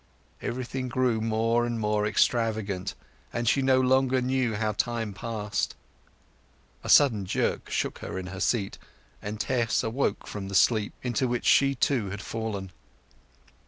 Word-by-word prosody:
Everything 130 Hz, +1 st, -3 dB
grew 125 Hz, -3 st, +1 dB
more 115 Hz, +1 st, +1 dB
and 120 Hz, -1 st, -2 dB
more 105 Hz, -1 st, +1 dB
extravagant, 105 Hz, -4 st, 0 dB, 0.4 s
and 120 Hz, -1 st, -2 dB
she 135 Hz, -, +3 dB
no 130 Hz, -1 st, +4 dB
longer 130 Hz, 0 st, +3 dB
knew 125 Hz, -3 st, 0 dB
how 110 Hz, 0 st, 0 dB
time 115 Hz, 0 st, -2 dB
passed. 105 Hz, -1 st, -3 dB, 1.1 s
A -, -, -6 dB
sudden 120 Hz, -9 st, +6 dB
jerk 90 Hz, -, -1 dB
shook -, -, -2 dB
her -, -, -6 dB
in 95 Hz, -, -4 dB
her 95 Hz, -, -6 dB
seat, 100 Hz, -1 st, 0 dB, 0.4 s
and 105 Hz, +1 st, -5 dB
Tess 120 Hz, -1 st, +1 dB
awoke 115 Hz, +4 st, -1 dB
from 100 Hz, -2 st, -6 dB
the 100 Hz, -, -5 dB
sleep 105 Hz, +2 st, +3 dB
into 125 Hz, 0 st, 0 dB
which 120 Hz, 0 st, -2 dB
she, 140 Hz, 0 st, +5 dB
too, 120 Hz, -5 st, +1 dB
had 100 Hz, +1 st, -6 dB
fallen. 105 Hz, -4 st, -4 dB
115 Hz, 150 wpm, -27 LUFS, 105-125 Hz, 1.1 s, sudden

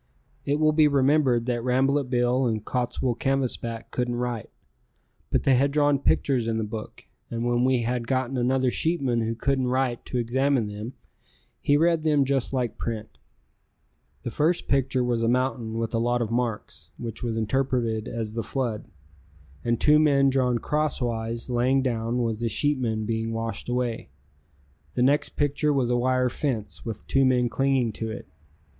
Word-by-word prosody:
It 145 Hz, +1 st, 0 dB
will 155 Hz, 0 st, +4 dB
be 155 Hz, 0 st, +5 dB
remembered 135 Hz, -3 st, +3 dB
that 120 Hz, -2 st, -1 dB
Rambolet 135 Hz, +2 st, +1 dB
Bill 125 Hz, +1 st, +2 dB
and 110 Hz, -2 st, -2 dB
Cottswool 125 Hz, -1 st, -1 dB
Canvasback 125 Hz, -4 st, -2 dB
couldn't 125 Hz, -1 st, -1 dB
write, 120 Hz, -2 st, -3 dB, 0.8 s
but -, -, +1 dB
they 135 Hz, -, +4 dB
had 135 Hz, +3 st, +3 dB
drawn 145 Hz, -1 st, +2 dB
pictures 130 Hz, -3 st, +1 dB
in 115 Hz, -1 st, 0 dB
the 110 Hz, -, -1 dB
book, 110 Hz, 0 st, -7 dB, 0.2 s
and 115 Hz, 0 st, -3 dB
when 120 Hz, 0 st, +2 dB
we 130 Hz, -2 st, +2 dB
had 120 Hz, 0 st, -2 dB
gotten 130 Hz, 0 st, -1 dB
another 130 Hz, +1 st, +1 dB
sheepman 135 Hz, -8 st, 0 dB
who 115 Hz, +1 st, -1 dB
couldn't 130 Hz, +2 st, 0 dB
write 125 Hz, -1 st, 0 dB
to 125 Hz, -, -3 dB
examine 130 Hz, +1 st, +1 dB
them 105 Hz, +4 st, -6 dB, 0.7 s
he 145 Hz, -, +3 dB
read 165 Hz, +1 st, +3 dB
them 150 Hz, -3 st, +3 dB
just 135 Hz, -2 st, 0 dB
like 125 Hz, -4 st, -2 dB
print. 110 Hz, -2 st, -5 dB, 1.0 s
The 120 Hz, -, -4 dB
first 165 Hz, +6 st, +1 dB
picture 135 Hz, -2 st, +1 dB
was 120 Hz, -2 st, 0 dB
a 115 Hz, -, +1 dB
mountain 120 Hz, -2 st, 0 dB
with 115 Hz, 0 st, -2 dB
a 115 Hz, -, +1 dB
lot 120 Hz, +1 st, +1 dB
of 110 Hz, -, -5 dB
marks, 115 Hz, -8 st, -3 dB
which 115 Hz, -3 st, -6 dB
was 115 Hz, -2 st, -2 dB
interpreted 115 Hz, -1 st, 0 dB
as 110 Hz, -2 st, -4 dB
the 115 Hz, -, -2 dB
flood, 120 Hz, -4 st, -3 dB, 0.8 s
and 120 Hz, -1 st, 0 dB
two 150 Hz, 0 st, +5 dB
men 140 Hz, -3 st, +4 dB
drawn 125 Hz, -2 st, +2 dB
crosswise 120 Hz, -6 st, -2 dB
laying 130 Hz, +2 st, +2 dB
down 115 Hz, -1 st, -1 dB
was 115 Hz, -2 st, -2 dB
the 120 Hz, -1 st, -1 dB
sheepmen 115 Hz, -4 st, 0 dB
being 115 Hz, 0 st, -2 dB
washed 115 Hz, 0 st, -4 dB
away. 120 Hz, -, -2 dB, 0.9 s
The 125 Hz, -, +2 dB
next 140 Hz, +3 st, +2 dB
picture 145 Hz, +1 st, +1 dB
was 130 Hz, -4 st, +1 dB
a -, -, +3 dB
wire 130 Hz, +1 st, +2 dB
fence 115 Hz, -7 st, -3 dB
with 115 Hz, -3 st, -6 dB
two 135 Hz, -, +2 dB
men 125 Hz, -2 st, +3 dB
clinging 135 Hz, -1 st, +1 dB
to 110 Hz, +1 st, -5 dB
it. 110 Hz, -, -7 dB
125 Hz, 170 wpm, -25 LUFS, 115-135 Hz, 1.0 s, be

